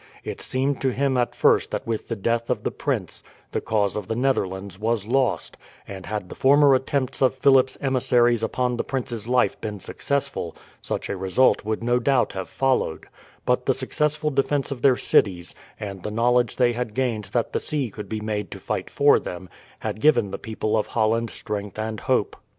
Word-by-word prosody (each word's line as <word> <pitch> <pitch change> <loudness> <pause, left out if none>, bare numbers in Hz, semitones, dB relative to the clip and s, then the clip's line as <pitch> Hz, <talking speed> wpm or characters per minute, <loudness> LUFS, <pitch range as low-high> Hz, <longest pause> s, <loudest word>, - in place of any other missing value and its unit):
It - - -6
seemed 135 +1 -1
to 135 - +2
him 135 +1 0
at 120 -1 0
first - - +3
that - - -4
with 115 -1 -3
the 115 - -2
death 115 +3 -1
of - - -1
the - - -1
prince - - -3 0.3
the - - -1
cause 105 -3 0
of 105 -3 -4
the 115 - -2
Netherlands 100 -7 -1
was 110 -1 0
lost, 130 +3 0 0.3
and 95 -2 -8
had 105 -4 -3
the - - -8
former 140 +1 +5
attempts 130 0 0
of 130 -1 +3
Philip's 130 -1 +4
emissaries 120 -3 +2
upon 125 +2 -1
the - - -1
prince's 120 -5 -3
life 125 0 +2
been 105 -2 -4
successful 135 - -3 0.3
such - - -3
a - - -3
result 95 +7 +2
would 110 +1 -2
no 120 +1 +2
doubt 125 -2 +2
have 95 -3 -5
followed; 130 -11 0 0.4
but 125 - +1
the 135 - +3
successful 150 +3 0
defence 140 +1 0
of 130 -3 -5
their 130 -2 +5
cities, 90 -4 +2 0.3
and 100 -3 -6
the 105 - -4
knowledge 120 +1 +2
they 120 -1 +3
had 120 -3 -4
gained 120 -5 -1
that 115 +4 -2
the - - +1
sea 140 -7 -2
could 105 +1 -8
be 110 -1 -3
made 105 -1 -3
to - - -7
fight 95 0 -3
for 145 0 +4
them, 90 0 -7 0.3
had 110 - -4
given 120 -9 +4
the - - -5
people 110 -1 -2
of 110 - 0
Holland 115 +1 +1
strength 105 -2 -5
and 110 0 -3
hope. 125 -5 0
120 Hz, 195 wpm, -24 LUFS, 105-130 Hz, 0.4 s, former